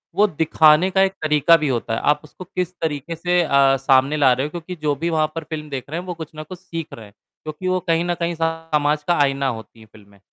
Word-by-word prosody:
वो 210 Hz, -, +4 dB
दिखाने 160 Hz, 0 st, +3 dB
का 190 Hz, 0 st, +2 dB
एक 195 Hz, 0 st, +2 dB
तरीका 155 Hz, +2 st, +4 dB
भी 150 Hz, -2 st, -2 dB
होता 120 Hz, -3 st, -2 dB
है, -, -, -1 dB
आप 150 Hz, 0 st, +1 dB
उसको 155 Hz, +4 st, -12 dB
किस 180 Hz, 0 st, -4 dB
तरीके 160 Hz, +1 st, -3 dB
से 175 Hz, +2 st, +1 dB
अ, 140 Hz, -2 st, +3 dB
सामने 135 Hz, +2 st, +2 dB
ला 135 Hz, -3 st, +5 dB
रहे 130 Hz, +3 st, -1 dB
हो -, -, -4 dB
क्योंकि 175 Hz, +2 st, -7 dB
जो 145 Hz, -1 st, 0 dB
भी 165 Hz, +5 st, -2 dB
वहाँ 155 Hz, -1 st, +1 dB
पर 165 Hz, -, -4 dB
फ़िल्म 155 Hz, -2 st, -7 dB
देख 135 Hz, 0 st, -6 dB
रहे 165 Hz, -, -3 dB
हैं 180 Hz, -, -8 dB
वो 180 Hz, -, -3 dB
कुछ 160 Hz, -2 st, -9 dB
ना 155 Hz, -, -6 dB
कुछ 175 Hz, +3 st, -10 dB
सीख 165 Hz, -4 st, -7 dB
रहे 110 Hz, -, -10 dB
हैं 100 Hz, -, -18 dB, 0.3 s
क्योंकि 155 Hz, +4 st, -6 dB
वो 185 Hz, 0 st, +1 dB
कहीं 165 Hz, +1 st, +2 dB
न 175 Hz, -, 0 dB
कहीं 170 Hz, 0 st, -2 dB
समाज 155 Hz, -2 st, 0 dB
का 175 Hz, -, +3 dB
आईना 135 Hz, 0 st, 0 dB
होती 115 Hz, -2 st, -6 dB
हैं 110 Hz, -, -16 dB
फिल्में, 100 Hz, -2 st, -19 dB
155 Hz, 260 wpm, -21 LUFS, 140-170 Hz, 0.3 s, ला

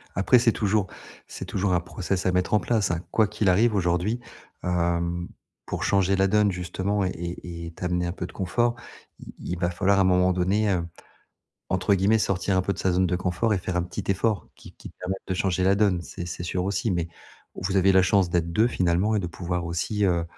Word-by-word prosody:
Après, 100 Hz, +6 st, +4 dB
c'est 115 Hz, 0 st, +4 dB
toujours 105 Hz, -2 st, 0 dB, 0.4 s
c'est -, -, -7 dB
toujours 95 Hz, -1 st, -1 dB
un 90 Hz, -, +3 dB
process 90 Hz, +2 st, -3 dB
à 95 Hz, -, +3 dB
mettre 90 Hz, +1 st, 0 dB
en 105 Hz, -, +5 dB
place, 105 Hz, -1 st, 0 dB
hein. 85 Hz, -1 st, -2 dB
Quoi 110 Hz, -2 st, +3 dB
qu'il 105 Hz, -1 st, 0 dB
arrive 110 Hz, +5 st, +3 dB
aujourd'hui, 90 Hz, +5 st, 0 dB, 0.4 s
hem, 85 Hz, 0 st, 0 dB, 0.4 s
pour -, -, -4 dB
changer 100 Hz, -1 st, +2 dB
la 95 Hz, 0 st, +3 dB
donne 105 Hz, 0 st, +3 dB
justement 95 Hz, +3 st, -2 dB
et 90 Hz, -, -1 dB, 0.3 s
et 85 Hz, -1 st, -7 dB
t'amener 90 Hz, -1 st, -1 dB
un -, -, -2 dB
peu 90 Hz, 0 st, -5 dB
de 85 Hz, -, -9 dB
confort, 120 Hz, +6 st, 0 dB, 0.4 s
il -, -, -12 dB
il 90 Hz, 0 st, -5 dB
va 85 Hz, -1 st, +1 dB
falloir 95 Hz, +3 st, +2 dB
à -, -, +5 dB
un -, -, +5 dB
moment 90 Hz, 0 st, +3 dB
donné, 95 Hz, +4 st, +1 dB
heu, 90 Hz, -3 st, 0 dB, 0.9 s
entre 95 Hz, +2 st, +2 dB
guillemets, 100 Hz, +4 st, +3 dB
«sortir 95 Hz, -2 st, 0 dB
un 95 Hz, -, +3 dB
peu 100 Hz, -, -1 dB
de -, -, -9 dB
sa 95 Hz, -, +1 dB
zone 90 Hz, +1 st, +2 dB
de 90 Hz, 0 st, 0 dB
confort» 90 Hz, +5 st, 0 dB
et -, -, 0 dB
faire 90 Hz, 0 st, -4 dB
un 90 Hz, -, +2 dB
petit 90 Hz, 0 st, -6 dB
effort, 100 Hz, +1 st, 0 dB
qui -, -, -14 dB
qui -, -, -11 dB
permet 95 Hz, +1 st, -4 dB
de 95 Hz, -, -2 dB
changer 95 Hz, -1 st, 0 dB
la 95 Hz, +1 st, +4 dB
donne, 100 Hz, -3 st, +2 dB
c'est 85 Hz, +1 st, -7 dB
c'est 85 Hz, -, -6 dB
sûr 90 Hz, +1 st, -2 dB
aussi 100 Hz, +3 st, -1 dB
mais 85 Hz, -2 st, -1 dB, 0.5 s
vous 95 Hz, +1 st, -2 dB
avez 95 Hz, +1 st, +5 dB
la 95 Hz, 0 st, +6 dB
chance 90 Hz, -1 st, +2 dB
d'être 85 Hz, -1 st, 0 dB
2 110 Hz, +7 st, +3 dB
finalement 90 Hz, +1 st, +1 dB
et -, -, +1 dB
de 90 Hz, -, -3 dB
pouvoir 90 Hz, 0 st, -3 dB
aussi, 85 Hz, +5 st, -1 dB
heu, 85 Hz, -3 st, +2 dB
95 Hz, 225 wpm, -25 LUFS, 90-100 Hz, 0.9 s, la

